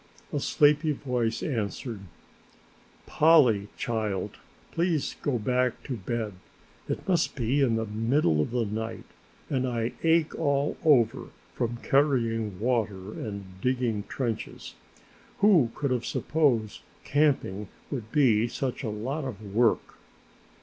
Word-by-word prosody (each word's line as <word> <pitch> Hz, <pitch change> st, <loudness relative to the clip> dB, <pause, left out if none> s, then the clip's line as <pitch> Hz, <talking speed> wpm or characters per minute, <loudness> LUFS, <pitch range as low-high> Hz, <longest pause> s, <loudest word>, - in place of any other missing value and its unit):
A -, -, +1 dB
sleepy 150 Hz, +1 st, +3 dB
voice 120 Hz, -5 st, -2 dB
answered. 115 Hz, -3 st, -3 dB, 1.1 s
"Polly 135 Hz, -11 st, +4 dB
child, 110 Hz, -5 st, -2 dB, 0.3 s
please 165 Hz, -3 st, 0 dB
go 140 Hz, -4 st, 0 dB
back 125 Hz, +2 st, 0 dB
to 130 Hz, -, -4 dB
bed, 110 Hz, 0 st, -3 dB, 0.6 s
it -, -, -3 dB
must 175 Hz, -4 st, +1 dB
be 130 Hz, +2 st, +1 dB
the 115 Hz, -4 st, +2 dB
middle 110 Hz, -, +1 dB
of -, -, -1 dB
the 120 Hz, -1 st, 0 dB
night 110 Hz, +2 st, -4 dB, 0.4 s
and 130 Hz, -2 st, 0 dB
I 115 Hz, -1 st, -1 dB
ache 165 Hz, -1 st, +3 dB
all 140 Hz, -2 st, 0 dB
over 130 Hz, -5 st, +3 dB, 0.3 s
from 120 Hz, -1 st, -2 dB
carrying 115 Hz, -8 st, +1 dB
water 105 Hz, -4 st, -1 dB
and 100 Hz, -3 st, -7 dB
digging 125 Hz, -5 st, 0 dB
trenches. 120 Hz, -5 st, -4 dB, 0.6 s
Who 185 Hz, -, +5 dB
could 140 Hz, -3 st, -1 dB
have 120 Hz, -2 st, -1 dB
supposed 125 Hz, -9 st, 0 dB, 0.2 s
camping 135 Hz, -9 st, +1 dB, 0.2 s
would 115 Hz, -5 st, -5 dB
be 120 Hz, -6 st, +4 dB
such 130 Hz, +1 st, -3 dB
a 115 Hz, -, -2 dB
lot 130 Hz, +9 st, -3 dB
of 110 Hz, -6 st, -7 dB
work!" 115 Hz, 0 st, +1 dB
120 Hz, 120 wpm, -27 LUFS, 110-140 Hz, 1.1 s, Who